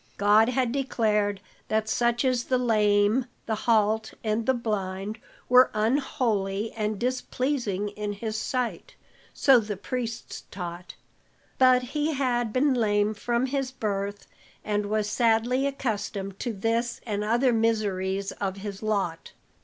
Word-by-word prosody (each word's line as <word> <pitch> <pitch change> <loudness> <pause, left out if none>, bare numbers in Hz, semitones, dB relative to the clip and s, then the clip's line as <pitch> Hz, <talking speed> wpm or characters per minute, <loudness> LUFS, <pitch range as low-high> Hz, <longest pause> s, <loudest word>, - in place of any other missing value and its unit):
God 210 +3 +5
had 250 -1 +1
declared 210 -7 0 0.3
that 215 0 0
such 240 +3 +1
as 250 -2 +1
the 255 - +1
lame, 215 0 +2 0.2
the 225 - -1
halt 220 0 +1
and 220 +1 -1
the 260 - +4
blind 210 -2 -3 0.3
were 250 +1 +6
unholy 220 -3 0
and 215 -1 -2
displeasing 250 -3 -1
in 205 0 -4
his 215 +1 -4
sight, 250 +2 -3 0.4
so 270 -3 +5
the 210 -3 -4
priests 230 +2 -5
taught. 175 -1 -7 0.6
But 255 -1 +6
he 300 +5 -1
had 245 -4 0
been 265 +4 +2
lame 210 -3 +2
from 235 +4 -1
his 270 0 -1
birth 205 -5 -3 0.4
and 210 -1 0
was 215 0 0
sadly 235 +4 +2
accustomed 205 -7 -3
to 240 - -2
this 230 +3 -1
and 210 -2 -2
other 240 +4 +2
miseries 200 -4 0
of 195 -1 -4
his 200 0 -6
lot. 200 -7 -2
220 Hz, 135 wpm, -26 LUFS, 205-250 Hz, 0.6 s, were